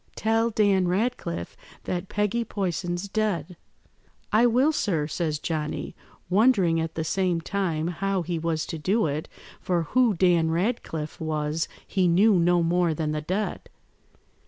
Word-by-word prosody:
Tell 225 +1 +1
Dan 200 -4 +2
Ratcliffe 180 - -2 0.3
that 180 +1 -3
Peggy 210 +3 0
Poyson's 180 -3 -3
dead.' 195 -6 -1 0.8
"'I 220 +3 +5
will, 255 +6 +3
sir,' 175 - 0
says 155 0 -2
Johnny, 155 0 -3 0.3
wondering 190 -4 +3
at 160 0 -4
the 160 - -1
same 180 +1 0
time 165 -3 -2
how 195 +1 -1
he 170 0 -3
was 160 -1 -1
to 165 - -5
do 200 +7 +1
it, 150 +1 -3 0.3
for 175 -2 0
who 235 +5 +2
Dan 170 -2 +3
Ratcliffe 165 -4 -2
was 155 0 -1 0.2
he 185 -2 +1
knew 195 +6 +5
no 175 0 +3
more 170 -1 +2
than 155 -1 -2
the 150 0 -2
dead. 190 +7 -3
175 Hz, 145 wpm, -26 LUFS, 160-205 Hz, 0.8 s, I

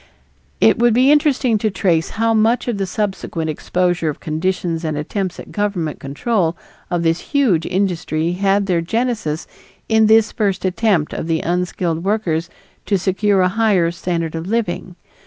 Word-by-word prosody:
It 110 - +4
would 240 -1 +4
be 260 +3 +5
interesting 275 -6 +3
to 215 - +1
trace 170 -4 +1
how 225 0 +2
much 225 +3 +2
of 230 -4 -2
the 195 - -1
subsequent 180 -5 -2
exposure 175 +1 0
of 150 - -5
conditions 165 +1 -2
and 155 -2 -2
attempts 185 +5 -3
at - - -10
governmental 200 -7 -2
control 170 - -1 0.3
of 175 -2 -1
this 165 0 +2
huge 235 - +1
industry 175 -4 -1
had 195 +2 +1
their 180 -3 +1
genesis 210 -5 -2 0.4
in 220 -1 +4
this 220 0 +5
first 200 -4 -1
attempt 185 -4 +1
of - - -4
the 165 -1 0
unskilled 175 -1 -1
workers 175 -5 -1 0.4
to 200 - +2
secure 195 +1 +1
a 180 - +4
higher 195 -5 +2
standard 170 -2 -3
of 165 +1 -5
living. 190 -4 -2
185 Hz, 160 wpm, -19 LUFS, 165-215 Hz, 0.4 s, be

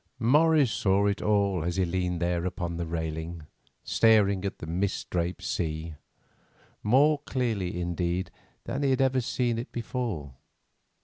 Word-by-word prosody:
Morris 145 +2 +4
saw 100 0 +2
it 100 0 0
all 100 -5 +1
as 85 +1 -2
he 95 -1 +2
leaned 90 0 -1
there 85 0 0
upon 90 -1 -3
the 85 -1 -3
railing, 80 0 -4 0.4
staring 100 -4 +3
at 100 - -3
the - - -7
mist 90 +5 -2
draped 85 0 -2
sea, 80 -1 -3 0.9
more 140 +7 +4
clearly, 110 -11 -2
indeed, 85 +1 -2 0.3
than 135 +4 -3
he 140 - +2
had 130 0 +2
ever 130 -1 +2
seen 120 -1 -1
it 120 - -6
before. 115 - -4
95 Hz, 145 wpm, -28 LUFS, 85-120 Hz, 0.9 s, Morris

